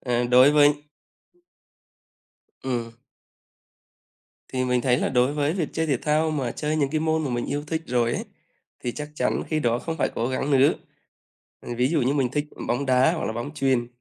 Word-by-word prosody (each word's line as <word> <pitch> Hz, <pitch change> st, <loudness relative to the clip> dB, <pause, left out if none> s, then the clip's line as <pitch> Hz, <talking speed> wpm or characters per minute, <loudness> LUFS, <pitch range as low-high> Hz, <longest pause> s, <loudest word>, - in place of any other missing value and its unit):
Ờ, 120 Hz, -1 st, 0 dB
đối 125 Hz, +3 st, +6 dB
với 145 Hz, -1 st, +6 dB, 1.9 s
Ừm. 120 Hz, -3 st, -2 dB, 1.6 s
Thì 130 Hz, -1 st, -2 dB
mình 125 Hz, 0 st, +1 dB
thấy 125 Hz, 0 st, +2 dB
là -, -, 0 dB
đối 125 Hz, +2 st, +2 dB
với 145 Hz, +1 st, 0 dB
việc 170 Hz, -5 st, -2 dB
chơi 160 Hz, 0 st, -1 dB
thể 140 Hz, -4 st, +1 dB
thao 155 Hz, +4 st, +1 dB
mà 135 Hz, -6 st, -2 dB
chơi 155 Hz, +1 st, -2 dB
những 140 Hz, -3 st, +1 dB
cái 155 Hz, -, 0 dB
môn 160 Hz, 0 st, 0 dB
mà 135 Hz, -, -2 dB
mình 120 Hz, -1 st, -2 dB
yêu 145 Hz, +1 st, -3 dB
thích 160 Hz, +1 st, -2 dB
rồi 120 Hz, -1 st, +1 dB
ấy, -, -, -3 dB, 0.6 s
thì 120 Hz, -, -1 dB
chắc 150 Hz, 0 st, -6 dB
chắn -, -, 0 dB
khi 155 Hz, -1 st, 0 dB
đó 120 Hz, -2 st, +1 dB
không 165 Hz, +3 st, -5 dB
phải -, -, +1 dB
cố 115 Hz, -, -1 dB
gắng 130 Hz, +2 st, -2 dB
nữa. 135 Hz, 0 st, +5 dB, 0.9 s
Ờ, 120 Hz, -, -6 dB
ví 125 Hz, +1 st, +3 dB
dụ 155 Hz, -2 st, +1 dB
như 130 Hz, +3 st, +1 dB
mình 135 Hz, -4 st, +1 dB
thích 150 Hz, +1 st, -1 dB, 0.2 s
bóng 125 Hz, +4 st, -1 dB
đá 130 Hz, +5 st, +4 dB
hoặc 165 Hz, -, -3 dB
là -, -, -2 dB
bóng 120 Hz, +6 st, -5 dB
chuyền 130 Hz, -5 st, +1 dB
135 Hz, 200 wpm, -24 LUFS, 125-150 Hz, 1.9 s, đối